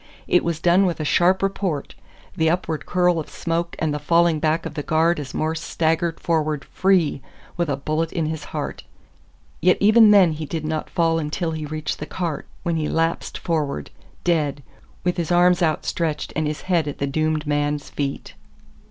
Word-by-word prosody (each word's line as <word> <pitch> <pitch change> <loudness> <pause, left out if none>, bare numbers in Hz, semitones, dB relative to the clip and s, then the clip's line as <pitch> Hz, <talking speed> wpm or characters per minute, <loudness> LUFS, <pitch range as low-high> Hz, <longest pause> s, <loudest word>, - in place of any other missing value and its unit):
It 180 - +3
was 170 -2 -1
done 180 +3 +4
with 175 - -2
a 155 - -2
sharp 180 +5 +3
report, 190 -7 -2 0.4
the 160 0 +2
upward 165 -2 -2
curl 180 -1 +2
of 155 - -6
smoke 170 +1 -2
and 155 -2 -1
the 150 - -2
falling 170 0 +3
back 160 +1 0
of - - -5
the 150 - -3
guard 160 +3 +2
as 140 -3 -7
Morse 160 0 -1
staggered 165 +1 0
forward 155 -3 0
FREE 180 -7 +1 0.3
with 170 -3 -1
a 140 - 0
bullet 155 +3 -1
in 165 -3 -1
his 155 0 -4
heart. - - -5 0.8
Yet 180 +2 +4
even 215 +2 +7
then 195 -5 +6
he 155 0 -5
did 160 0 -4
not 155 0 -3
fall 165 -1 +1
until 160 +2 -2
he 155 -1 -4
reached 155 0 -4
the 150 - -5
cart, 170 -5 -4 0.2
when 170 -2 0
he 155 -1 -1
lapsed 165 +1 -1
forward, 150 - -2 0.3
dead, 150 -5 0 0.4
with 180 0 0
his 170 0 -2
arms 175 0 +4
outstretched 155 -1 -1
and 155 0 0
his 150 0 -4
head 170 -5 +1
at 145 - -4
the 140 - -1
doomed 155 +2 0
man's 145 0 -1
feet. 140 -1 -4
160 Hz, 185 wpm, -22 LUFS, 150-175 Hz, 0.8 s, even